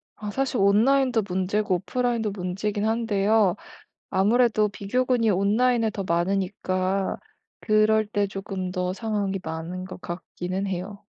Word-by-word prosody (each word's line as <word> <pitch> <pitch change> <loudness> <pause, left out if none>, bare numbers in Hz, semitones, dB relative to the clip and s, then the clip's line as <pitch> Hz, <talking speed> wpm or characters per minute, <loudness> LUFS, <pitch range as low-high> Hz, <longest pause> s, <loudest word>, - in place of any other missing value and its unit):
아 210 - -6
사실 270 0 -1
온라인도 230 +5 +4
문제고 190 +2 0
오프라인도 225 +3 -1
문제이긴 200 +2 -2
한데요 220 -3 +2 0.6
아무래도 215 +2 +3
비교군이 230 +3 0
온라인에 220 +4 +2
더 200 -2 -5
많으니까 185 +2 0 0.4
그럴 215 0 +3
때 205 -1 0
조금 195 -1 -5
더 180 0 -1
상황이 200 -2 -2
많은 165 +3 -5
것 185 0 -9
같기는 180 +2 -4
해요. 195 +2 -5
200 Hz, 300 characters per minute, -25 LUFS, 185-220 Hz, 0.6 s, 온라인도